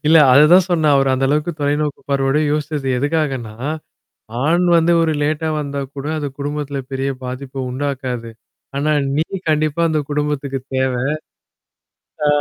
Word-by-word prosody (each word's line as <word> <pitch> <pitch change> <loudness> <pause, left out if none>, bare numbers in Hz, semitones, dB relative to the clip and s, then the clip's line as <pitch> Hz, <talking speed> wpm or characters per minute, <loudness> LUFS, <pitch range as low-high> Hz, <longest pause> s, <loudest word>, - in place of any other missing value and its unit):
இல்ல 160 +1 +6 0.2
அததான் 170 +7 +7
சொன்னேன். 155 -4 +3
அவரு 135 -1 +3
அந்த 135 +1 0
அளவுக்கு 150 +4 +1
தொலைநோக்கு 145 0 0
பார்வையோட 135 +1 +2
யோசிச்சது 150 -2 -2
எதுக்காகன்னா 135 -6 -1 0.9
ஆண் 170 +4 +3
வந்து 165 +1 +4
ஒரு 160 -1 +2
லேட்டா 155 +2 0
வந்தா 140 -1 -3 0.2
கூட 140 +1 -5
அது 145 - -2
குடும்பத்தில 145 -1 -3
பெரிய 135 +1 -1
பாதிப்ப 130 +1 -5
உண்டாக்காது. 130 -3 -3 0.5
ஆனா 150 +2 +1 0.3
நீ 155 - +2 0.2
கண்டிப்பா 155 +1 +1
அந்த 155 -1 +1
குடும்பத்துக்கு 145 -2 -1 0.2
தேவ. 130 -1 +1 1.3
ஆ - - +4
145 Hz, 135 wpm, -19 LUFS, 135-155 Hz, 1.3 s, அததான்